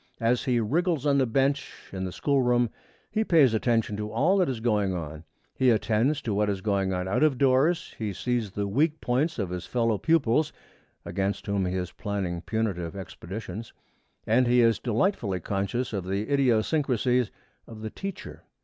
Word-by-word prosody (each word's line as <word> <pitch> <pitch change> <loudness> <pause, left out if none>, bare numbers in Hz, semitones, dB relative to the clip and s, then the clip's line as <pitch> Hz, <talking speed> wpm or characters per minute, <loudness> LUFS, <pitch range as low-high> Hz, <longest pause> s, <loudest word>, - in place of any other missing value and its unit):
As 120 +2 +1
he 125 -3 +2
wriggles 155 - 0
on 140 -1 +3
the 130 - +2
bench 135 +4 -1
in 95 -1 -3
the 90 - -4
school 140 +7 +1
room, 120 -2 +2 0.4
he 220 - +1
pays 155 - +5
attention 115 -1 +1
to 105 0 -4
all 170 +8 +3
that 185 -5 +2
is 125 -4 -3
going 105 -5 +1
on. 80 -2 -6 0.3
He 130 - +3
attends 120 +6 +2
to 110 - -1
what 105 +1 +1
is 100 -2 -1
going 100 -2 0
on 90 0 -2
out 95 - 0
of 155 -4 +3
doors; 140 +6 +2
he 110 -2 -2
sees 120 +2 -1
the 100 +1 -3
weak 150 +9 +1
points 135 +7 0
of 95 -6 -2
his 90 -1 -5
fellow 115 -4 +1
pupils, 155 - +2 0.5
against 100 +1 -2
whom 100 -2 0
he 90 - -2
is 90 -1 -3
planning 95 -5 -3
punitive 95 -3 -2
expeditions; 95 +3 -7 0.5
and 120 +3 +3
he 120 0 +5
is 115 -2 +3
delightfully 115 - 0
conscious 100 +7 -2
of 95 -3 -3
the 100 +8 -2
idiosyncrasies 125 -1 +2 0.4
of 110 -2 -10
the 110 - -4
teacher. 195 -2 -7
115 Hz, 180 wpm, -27 LUFS, 100-135 Hz, 0.5 s, pays